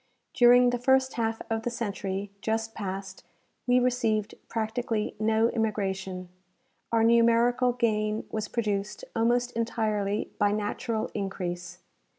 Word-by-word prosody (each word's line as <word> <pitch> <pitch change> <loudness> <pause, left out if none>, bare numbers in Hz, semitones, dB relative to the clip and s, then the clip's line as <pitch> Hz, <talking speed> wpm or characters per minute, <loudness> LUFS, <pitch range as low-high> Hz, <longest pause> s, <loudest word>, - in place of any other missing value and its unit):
During 245 0 +6
the 245 - -1
first 265 +1 +3
half 225 -1 -2
of 225 -1 -1
the 240 - -2
century 200 -4 -4
just 225 +1 -1
passed 190 -1 -6 0.4
we 245 0 +5
received 225 -4 +1 0.2
practically 225 -1 -2
no 220 +1 +3
immigration; 195 -4 -2 0.6
our 225 -1 +3
numerical 235 +2 +4
gain 215 -2 0
was 215 -1 -2
produced 210 -2 -2
almost 240 +2 +2
entirely 215 -3 -1
by 205 0 +3
natural 215 +2 -2
increase. 180 -3 -4
220 Hz, 120 wpm, -28 LUFS, 205-235 Hz, 0.6 s, During